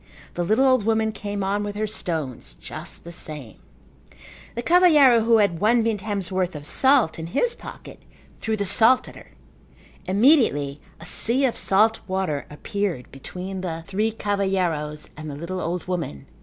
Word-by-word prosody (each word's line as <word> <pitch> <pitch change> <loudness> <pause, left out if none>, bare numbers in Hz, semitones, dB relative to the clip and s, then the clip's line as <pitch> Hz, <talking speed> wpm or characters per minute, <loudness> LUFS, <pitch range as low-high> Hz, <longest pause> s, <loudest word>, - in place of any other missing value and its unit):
The 175 - -2
little 220 +9 +3
old 255 -4 +4
woman 220 0 +1
came 205 -1 -4
on 200 +2 0
with 205 0 -5
her 215 +1 -1
stones 160 - -4
just - - -8
the 170 - -9
same. 150 -8 -6 1.0
The 235 - -3
cavalheiro 300 -9 +6
who 230 -1 +5
had 200 -6 +2
one 230 +2 +4
vintem's 205 -3 -2
worth 185 -2 -1
of 145 -1 -7
salt 260 - +3
in 160 - -5
his 370 - 0
pocket - - -11 0.4
threw 220 -1 -2
the 200 - -1
salt 230 +6 +4
at - - -11
her. - - -14 0.8
Immediately 185 - +3 0.2
a - - -10
sea 255 +4 +2
of 245 - 0
salt 220 +3 +3
water 185 -7 -2
appeared 185 - -4
between 185 +7 -7
the 165 -3 -4
three 210 +4 0
cavalheiros 185 -8 -1
and 155 +1 -7
the 145 - -6
little 170 +5 -5
old 175 +1 -3
woman. 165 - -4
195 Hz, 165 wpm, -23 LUFS, 165-225 Hz, 1.0 s, cavalheiro